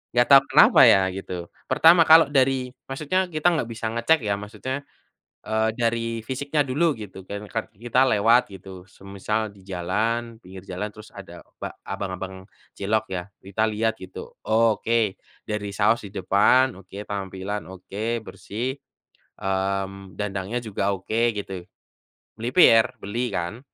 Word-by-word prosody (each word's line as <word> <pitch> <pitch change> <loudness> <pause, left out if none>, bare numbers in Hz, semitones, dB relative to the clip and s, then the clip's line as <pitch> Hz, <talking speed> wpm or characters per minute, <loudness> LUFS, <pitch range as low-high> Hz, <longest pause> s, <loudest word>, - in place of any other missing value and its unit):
Nggak 120 0 +5
tau 135 0 +10
kenapa - - +6
ya 95 - +6 0.2
gitu, 90 -3 -6 0.2
pertama 165 +5 +6
kalau 160 +1 +8
dari 130 -2 +2 0.2
maksudnya 155 +8 -1
kita 155 -1 0
nggak 150 - -1
bisa 115 0 -6
ngecek 115 +8 +3
ya 105 -1 0
maksudnya, 110 +5 -5 0.7
eee, 110 0 0
dari 115 -1 -1
fisiknya 140 +5 -2
dulu 145 +4 +1
gitu 100 -4 -10
kan, 100 +1 -6
kar 115 - -3
kita 120 +5 +2
lewat 115 +1 +4
gitu 95 -1 -11
semisal 100 +3 -4
di 100 - -18
jalan, 110 +6 -2
pinggir 95 -3 -12
jalan 95 +3 -3
terus 110 - -13
ada - - -11 0.2
ba - - -5
abang-abang 95 -1 -6 0.3
cilok 110 +2 0
ya, 90 -2 -3 0.2
kita 100 +3 -3
lihat 110 +1 0
gitu, 95 0 -10
oke 110 -1 +2 0.3
dari 105 -1 -2
saus 110 +2 +2
di 100 - -13
depan, 105 +6 +3
oke 95 0 -17 0.2
tampilan, 95 -1 -4
oke 105 +5 -4
bersih, 110 +7 -5 0.6
mmm, 95 -1 -3
dandangnya 100 +2 -3
juga 100 -2 -1
oke 115 +5 0
gitu, 95 -2 -5 0.8
melipir 115 -2 +5
beli 120 +5 -3
kan. 90 +6 -4
110 Hz, 140 wpm, -24 LUFS, 95-120 Hz, 0.8 s, tau